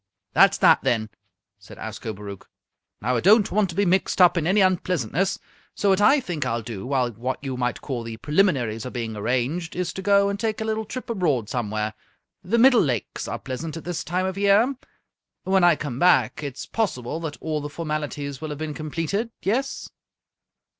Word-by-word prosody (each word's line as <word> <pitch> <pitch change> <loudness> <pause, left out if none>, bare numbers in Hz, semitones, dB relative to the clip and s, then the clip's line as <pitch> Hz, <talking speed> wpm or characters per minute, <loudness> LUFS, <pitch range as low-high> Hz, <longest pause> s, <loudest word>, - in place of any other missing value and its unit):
"That's - - +5
that, - - +5
then," 110 -2 0 0.5
said 100 - -14
Ascobaruch. 105 -2 -7 0.6
"Now, 125 +2 +1
I - - +1
don't 205 - +5
want 200 -1 +2
to 170 - -7
be 200 - +2
mixed 185 +2 +1
up 180 -1 +7
in 165 -2 0
any 195 +4 +3
unpleasantness, 185 - +1 0.4
so 200 - +1
what 190 +1 +3
I 275 +8 +6
think 175 - -3
I'll 115 0 -2
do 110 -1 -6
while 130 -3 +1
what 125 +4 -3
you 135 -2 -3
might 125 -1 -2
call 130 -4 -4
the 115 -1 -7
preliminaries 135 - +1
are 125 - -5
being 115 -3 -4
arranged 130 +10 -1
is 180 -1 -2
to 190 - -5
go 200 0 +4
and 200 0 -2
take 220 0 -1
a 220 - -2
little 220 0 -1
trip 255 +4 -7
abroad 150 - 0
somewhere. 110 -3 -2 0.5
The 220 +6 +1
Middle 250 0 +6
Lakes 125 - -2
are - - -3
pleasant 150 +5 -6
at 165 - -8
this 175 -1 -3
time 180 +5 -1
of 190 +1 -3
year. 205 +7 +4 0.7
When 190 -1 +2
I 175 -1 +6
come 135 -4 -5
back, 130 -10 +3
it's 140 -4 -6
possible 160 - -2
that 160 -3 -5
all 155 -1 -2
the 145 - -5
formalities 150 -3 -4
will 155 - -4
have 150 - -5
been 155 0 -4
completed, 165 +9 -3
yes?" 255 +8 -1
155 Hz, 195 wpm, -24 LUFS, 125-195 Hz, 0.7 s, up